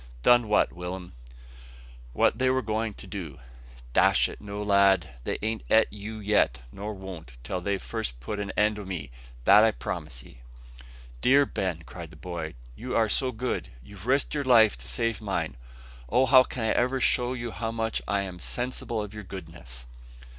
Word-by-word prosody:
"Done 120 - +6
what, 105 - +3
Will'm?" 90 +1 -6 1.0
"What 110 - +2
they 130 0 +3
were 130 0 +1
going 110 0 -2
to - - -9
do." 85 -9 -6 0.6
"Dash - - +5
it, - - -10
no, 105 0 -5
lad! 100 -5 +4
they - - -1
an't 110 0 -1
ate 110 -1 +4
you 105 +1 -6
yet; 105 - +2
nor 105 +6 -5
won't, 95 -9 -9
till 90 +9 -3
they've 100 +1 -1
first - - -5
put 80 +12 -4
an 100 -1 -3
end 105 0 +3
o' - - -6
me, 85 -9 -5 0.3
that 105 +2 +8
I 110 - +6
promise - - -5
ye." - - -16 0.8
"Dear 140 +2 +5
Ben," 90 -9 -3
cried - - -9
the - - -14
boy, 85 -5 -6 0.2
"you 125 +2 -5
are 110 -2 +3
so 130 +4 +1
good, 125 +2 -3
you've 100 - -12
risked 135 +2 +2
your 145 -1 -1
life 115 -5 +6
to - - -8
save 115 -2 -1
mine. 85 -9 -2 0.5
Oh! 125 +4 +4
how 130 -1 +7
can 125 - -4
I 110 - +2
ever 125 +3 +2
show 125 0 +2
you 120 -2 -4
how 115 +5 -3
much 115 -1 -2
I 100 0 +1
am 90 -2 -7
sensible 120 0 -3
of 105 0 -8
your 105 -1 -7
goodness?" 80 -10 -9
105 Hz, 185 wpm, -27 LUFS, 90-115 Hz, 1.0 s, that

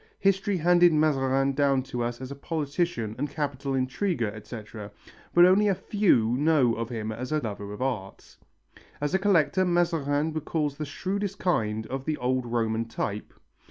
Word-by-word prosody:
History 195 0 +1
handed 175 +1 +5
Mazarin 135 -3 +2
down 135 -1 +2
to 125 -2 -5
us 120 0 -3
as 130 +1 -6
a - - -5
politician 145 - -2
and 145 +2 -1
capital 140 -2 -3
intriguer, 130 - -1
etc., 105 -1 -9 0.4
but 175 0 +7
only 200 +3 +4
few 145 - +2
know 145 -5 +3
of 115 0 -4
him 110 -3 -4
as 125 +5 -6
a 155 - +2
lover 105 -6 -5
of 105 +5 -4
art. 110 -8 -5 0.6
As 145 +3 -2
a 190 - +3
collector 185 -2 +3
Mazarin 160 -4 +1
recalls 155 -2 -2
the 155 - -3
shrewdest 195 +6 -3
kind 110 -13 0
of 135 +3 -5
the 155 -1 -1
old 125 0 -1
Roman 115 -1 0
type. 105 -2 -4
140 Hz, 160 wpm, -27 LUFS, 120-170 Hz, 0.6 s, but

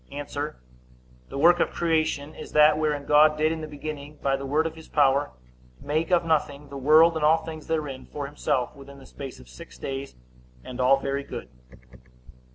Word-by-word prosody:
A. 145 +1 -5 1.0
The - - -6
work 170 +4 +5
of - - +2
creation 155 -3 -1
is - - -10
that 150 0 +6
wherein 150 -2 -1
God 150 +1 +5
did 155 +1 +2
in 165 -1 -4
the 155 - -5
beginning, 150 0 -7
by 135 -1 +1
the 135 0 -5
word 150 +4 +1
of 165 - -3
his 160 -1 -13
power, 140 -1 +2 0.5
make 155 +3 -1
of 175 -2 +3
nothing 145 -3 -1
the 140 - -9
world, 155 +5 +5
and 160 - -2
all 160 +1 +4
things 155 -2 -8
therein, 150 -5 -3
for 145 -1 -5
himself, 140 -2 -2
within 140 0 -13
the 135 - -14
space 135 0 -9
of 65 - -15
six 60 0 -13
days, 135 - -6 0.5
and 125 0 -6
all 130 +2 +5
very 140 +1 -2
good. 65 - -8
150 Hz, 190 wpm, -25 LUFS, 140-155 Hz, 1.0 s, that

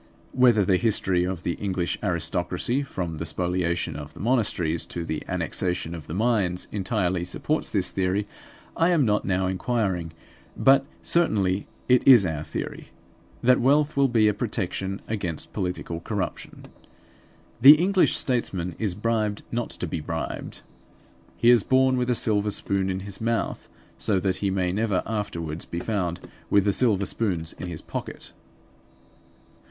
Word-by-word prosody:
Whether 120 -6 +4
the 95 0 +3
history 95 -4 +1
of 90 -2 -4
the 85 - -1
English 95 -3 -1
aristocracy, 90 - 0
from 85 - -5
the - - -2
spoliation 90 0 -1
of 75 0 -8
the - - -12
monasteries 100 -9 +1
to 85 -1 -5
the 80 -2 -3
annexation 90 -2 -2
of 80 -3 -8
the 80 - -5
mines, 100 -5 0
entirely 95 -3 -1
supports 150 - -2
this 95 -4 -1
theory 95 +2 0 0.5
I 165 - +3
am 165 -6 +3
not 105 -1 +1
now 95 -1 +1
inquiring; 95 -3 -1 0.5
but 135 +1 +4 0.2
certainly 100 - +1 0.2
it 125 -1 +5
is 120 -7 +8
our 80 -3 -2
theory, - - -6 0.6
that 125 +1 +5
wealth 145 +4 +3
will 140 -1 +4
be 115 -4 +3
a 105 - +3
protection 100 -3 -3
against 90 -7 -3
political 90 -3 -3
corruption. 95 +2 -5 1.0
The 140 +5 +11
English 185 +4 +3
statesman 95 -9 -1
is 105 -5 -1
bribed 105 -1 -1
not 120 0 -2
to - - -4
be 80 -1 -3
bribed. 80 +1 -5 0.8
He 120 - +5
is 120 -3 +6
born 130 0 +3
with 125 0 -1
a 125 - +2
silver 105 -2 +1
spoon 100 -1 -1
in 95 0 -2
his 100 +1 -7
mouth, 115 0 -2 0.3
so 100 -3 +1
that 95 0 0
he 100 +1 -1
may 95 -2 0
never 105 -1 0
afterwards 85 -7 -4
be 85 - -5
found 90 -4 -2 0.3
with 100 -1 +4
the 100 - +2
silver 105 -5 +2
spoons 90 -9 -2
in 90 - -7
his 85 -2 -6
pocket. - - -6
100 Hz, 155 wpm, -25 LUFS, 90-115 Hz, 1.0 s, The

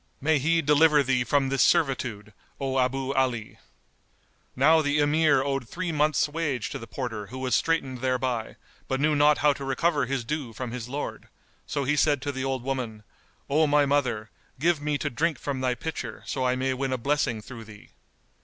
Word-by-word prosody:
May 150 +1 +2
He 165 +4 +2
deliver 150 0 +5
thee 125 -2 +1
from 135 +1 +1
this 135 -2 +1
servitude, 115 -8 +1 0.3
O 135 -1 -1
Abu 130 +1 0
Ali!" 125 -5 -1 1.0
Now 155 +5 +5
the 145 0 0
Emir 145 -2 +3
owed 135 -4 -2
three 180 -1 -3
months' 150 -2 +2
wage 145 -6 -2
to - - -5
the 115 - -9
porter 110 -3 -5
who 130 - -8
was 130 -1 -2
straitened 135 -6 0
thereby, 125 -3 -1 0.3
but 130 - -1
knew 150 +1 +2
not 150 +1 +5
how 145 0 +3
to 140 - -8
recover 140 +1 +1
his 135 -1 -2
due 145 -4 -4
from 125 0 -5
his 125 -1 -6
lord; 145 +3 -5 0.4
so 145 - -2
he 145 +3 +1
said 145 -1 +3
to 145 - -2
the 130 -1 -4
old 135 -2 -2
woman, 125 -5 -4 0.4
"O 155 +2 +3
my 145 0 +4
mother, 125 -6 0 0.3
give 165 0 +2
me 150 0 0
to 145 0 -3
drink 155 +6 0
from 135 -2 -4
thy 125 -1 +1
pitcher, 160 +5 -6
so 130 -2 -1
I 125 - +1
may 130 +1 0
win 135 +1 -2
a 130 - 0
blessing 135 -3 0
through 115 +1 -10
thee." 105 -1 -14
135 Hz, 195 wpm, -26 LUFS, 125-150 Hz, 1.0 s, deliver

